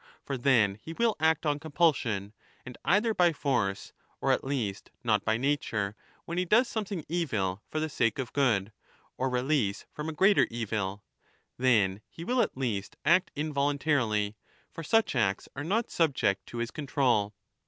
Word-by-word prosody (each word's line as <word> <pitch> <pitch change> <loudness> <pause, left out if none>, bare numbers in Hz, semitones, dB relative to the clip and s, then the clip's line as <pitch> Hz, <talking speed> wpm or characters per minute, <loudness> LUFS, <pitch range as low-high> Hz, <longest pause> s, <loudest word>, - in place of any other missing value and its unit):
For 140 - -3
then 115 -6 +3
he 165 - -7
will 230 +4 +1
act 160 +1 +2
on 145 -1 +1
compulsion, 140 - 0 0.3
and 125 - -8
either 220 +3 +3
^ - - -17
by 175 -2 +4
force, 120 -10 -1 0.3
or - - +1
at - - +1
least 115 -8 -3
not 105 -4 +2
by 110 0 +1
nature, 115 -7 -1 0.3
when 170 +1 -2
he 180 - +1
does 230 +7 +4
something 200 -8 -4
evil 110 - -1
for 155 - -2
the 155 - 0
sake 115 -7 0
of 130 -3 -4
good, 110 -8 +2 0.4
or 130 +1 -1
release 125 -5 0
from 150 +1 -5
a - - -4
greater 195 +6 +4
evil; 105 -3 -3 0.5
then 105 -6 +2
he 165 - -9
will 250 +6 +2
at - - -1
least 110 -7 -3
act 180 +3 +4
involuntarily, 140 -8 0 0.4
for 165 - -7
such 225 +2 +2
acts 100 -5 +1
are 145 - -4
not 215 +8 0
subject 140 - +1
to 120 - -8
his 120 0 -2
con 150 -2 -6
20 - - -17
trol. 105 -4 +2
135 Hz, 175 wpm, -29 LUFS, 105-160 Hz, 0.5 s, by